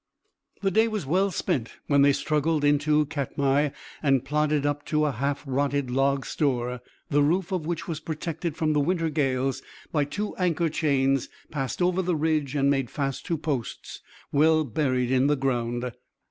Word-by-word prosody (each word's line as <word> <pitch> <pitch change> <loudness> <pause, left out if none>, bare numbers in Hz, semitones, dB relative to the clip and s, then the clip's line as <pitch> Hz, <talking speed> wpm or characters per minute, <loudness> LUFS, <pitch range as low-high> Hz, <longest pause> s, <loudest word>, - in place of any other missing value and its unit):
The 195 - +2
day 220 +4 +4
was 215 -7 -3
well 185 +8 +2
spent 130 -9 -2
when 140 -1 +3
they 140 0 +6
struggled 150 +2 0
into 150 +1 +3
Katmai 140 0 0 0.3
and 135 -4 +2
plodded 150 0 +1
up 145 0 -1
to 150 -1 +2
a 150 - +1
half 140 +3 -2
rotted 140 -1 0
log 135 +1 +1
store, 125 -4 -1 0.3
the 145 0 +4
roof 175 +6 +1
of 175 -5 -2
which 170 -1 -3
was 160 -3 -3
protected 160 0 -4
from 155 -1 +1
the 150 - +2
winter 165 +1 0
gales 135 -3 0 0.3
by 150 -3 +1
two 205 +9 -4
anchor 170 -2 +1
chains 135 -4 +1 0.2
passed 140 +3 -2
over 180 +1 +2
the 180 -2 0
ridge 155 -3 0
and 140 -1 +2
made 135 -3 +1
fast 135 -2 -3
to 165 - 0
posts 145 -6 -4 0.3
well 155 +2 +4
buried 130 -2 0
in 130 +1 +3
the 150 - +3
ground. 120 -2 -1
145 Hz, 175 wpm, -26 LUFS, 135-160 Hz, 0.3 s, they